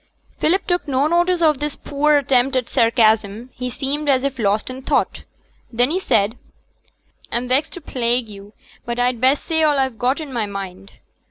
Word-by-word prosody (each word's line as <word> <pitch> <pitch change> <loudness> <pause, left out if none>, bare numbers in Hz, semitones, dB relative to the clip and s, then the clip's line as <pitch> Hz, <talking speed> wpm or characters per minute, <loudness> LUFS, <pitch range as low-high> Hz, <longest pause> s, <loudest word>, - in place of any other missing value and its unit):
Philip 375 +5 +1
took 355 -4 -1
no 270 0 +1
notice 345 +2 +2
of 305 -4 +3
this 295 0 -3
poor 295 +1 +1
attempt 265 -1 +2
at 255 -2 0
sarcasm: 225 0 +2
he 250 0 -4
seemed 285 +3 -2
as 260 -1 +3
if 270 -2 -3
lost 210 0 0
in 260 +1 -8
thought, - - -1 0.5
then 245 +4 +2
he 365 - 0
said, 220 - 0 0.9
'I'm 240 +1 -1
vexed 260 +4 +1
to 355 - -8
plague 240 -3 0
yo', 205 0 -12 0.3
but 235 0 -4
I'd 245 -1 0
best 265 +3 +3
say 320 -1 0
all 300 -2 +3
I've 265 -4 -1
got 255 +4 +1
i' 315 - -5
my 240 -7 -3
mind. 195 -1 -8
255 Hz, 185 wpm, -20 LUFS, 230-295 Hz, 0.9 s, of